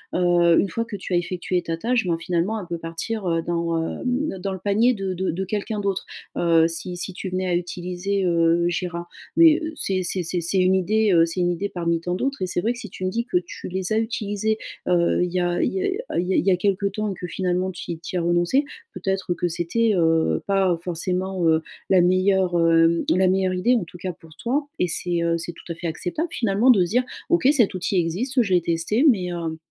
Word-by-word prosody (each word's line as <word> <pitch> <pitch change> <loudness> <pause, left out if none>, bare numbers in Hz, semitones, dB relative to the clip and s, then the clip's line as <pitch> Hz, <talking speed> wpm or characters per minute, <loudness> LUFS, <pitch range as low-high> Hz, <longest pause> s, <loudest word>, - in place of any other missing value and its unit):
heu, 175 -1 +4
une 200 - +1
fois 230 +4 -2
que 230 -2 -7
tu 190 -1 -5
as - - +4
effectué 180 +1 -1
ta 165 -1 -3
tâche, 235 +2 0
ben 170 -1 +1
finalement 175 +5 -1
elle 195 - -7
peut 170 -1 -5
partir, 165 +6 -4
heu, 165 -1 0
dans, 170 -1 -1 0.2
hem, - - -6 0.2
ne 195 - -4
dans 195 +1 -3
le 190 - -6
panier 215 +6 +2
de 195 -2 -3
de 185 +1 -2
de 180 +4 -2
quelqu'un 210 +2 -3
d'autre. 200 -2 -2 0.3
Heu, 165 -1 +4
si 165 -1 -1 0.2
si 175 - -4
tu 190 - -6
venais 185 +1 -2
à 175 - +1
utiliser, 180 +2 -2
heu, 170 0 +3
Jira, 175 0 -3 0.3
mais, 330 -1 +6
heu, 320 0 -4
c'est 190 -9 -1
c'est 180 0 -1
c'est 175 +2 -2
c'est 175 +3 0
une 185 +1 +4
idée, 210 +3 +2
heu, 165 -1 +6
c'est 170 +2 -3
une 175 0 +2
idée 180 +4 -2
parmi 170 -2 -1
tant 175 +2 -3
d'autres 270 +4 -2
et 185 - 0
c'est 180 - -1
vrai 225 - +1
que 235 - -9
si 215 - -8
tu 185 - -8
me - - +1
dis 235 +3 -2
que 245 - 0
tu 175 -1 -6
les 185 +1 -3
as 215 - +3
utilisés, 220 -1 -1 0.3
heu, 175 -1 +2
il 180 - -2
y 185 - +1
a 175 0 0
il - - 0
y 385 - -1 0.3
a, - - -4
heu, - - +2
il 180 - -4
y 190 - +1
a - - +1
il - - -2
y - - +6
a - - +5
quelque 200 +1 0
temps 210 +1 -2
et - - -3
que 180 - -5
finalement 180 +1 -1
tu 180 - -7
y 165 - -5
tu 170 - -7
y - - +2
as - - -1
renoncé, 175 - +2 0.3
peut-être 190 0 -2
que 175 0 -1
c'était, 180 +7 0
heu, 165 -2 +2
pas 190 -3 +2
forcément, 180 +1 -2
heu, 160 0 +3 0.3
la 190 - +5
meilleure, 185 0 +2
hem, 165 0 +4
la 185 +1 +3
meilleure 185 0 +1
idée 225 +8 +2
en 230 - 0
tout 170 +1 -12
cas, 180 +1 -4
pour 165 -2 -18
toi, 275 +5 -1
et 180 - +2
c'est, 170 +1 0
heu, 170 0 +1
c'est 170 +1 -5
tout 165 - -15
à - - -4
fait 170 - -5
acceptable 180 - -3
finalement 225 -1 +3
de 195 -7 +4
se - - -6
dire: 245 +5 +2 0.3
«OK, 345 -6 +3
cet 245 -9 +3
outil 185 +1 -1
existe, 230 +11 0
je 200 -5 0
l'ai 180 - +4
testé, 170 - +1
mais, 180 -7 +1
heu, 165 -2 -4
180 Hz, 255 wpm, -23 LUFS, 170-200 Hz, 0.3 s, mais